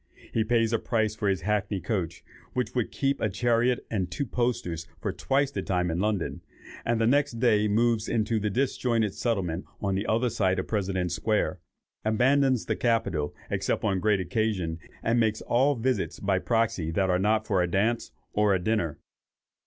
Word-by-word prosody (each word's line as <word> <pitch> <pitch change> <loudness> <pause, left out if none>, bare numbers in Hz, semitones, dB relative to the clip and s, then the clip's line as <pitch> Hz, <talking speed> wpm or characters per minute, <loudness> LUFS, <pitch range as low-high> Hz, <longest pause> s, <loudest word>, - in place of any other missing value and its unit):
He 110 - +2
pays 115 0 +2
a 115 - +2
price 110 -3 0
for 105 -2 -1
his 95 -4 0
hackney 105 0 0
coach 90 -6 -3 0.3
which 125 -1 -1
would 125 -3 0
keep 140 0 0
a 110 - +2
chariot 120 +3 +1
and 95 -5 -1
two 140 - -2
posters 120 -10 -2
for - - -2
twice 140 +1 0
the - - -3
time 90 -2 0
in 85 - -2
London, 105 -3 -1 0.4
and 115 -1 0
the 115 - +3
next 145 +3 +3
day 115 -3 +3
moves 115 +1 +2
into 110 0 +1
the 105 0 -1
disjointed 115 -3 0
settlement 95 -7 -1
on 100 -1 -1
the 100 +2 -1
other 115 +2 +1
side 95 -3 +1
of 95 - -2
President's 95 -4 -1
Square, 105 -2 0 0.4
abandons 130 +3 +3
the - - 0
Capitol, 115 -11 0 0.2
except - - -1
on 95 -3 +1
great 105 +1 +2
occasions, 90 -3 -1 0.2
and 115 +1 +2
makes 110 -2 +1
all 135 +4 +3
visits 120 -3 -1
by 95 -2 +1
proxy 100 -4 0
that 95 +3 +1
are 90 - +2
not 110 +2 +2
for 95 -3 +2
a 90 - +1
dance, 110 +6 0 0.2
or 105 -2 +3
a - - 0
dinner. 90 -5 0
110 Hz, 185 wpm, -27 LUFS, 95-120 Hz, 0.4 s, the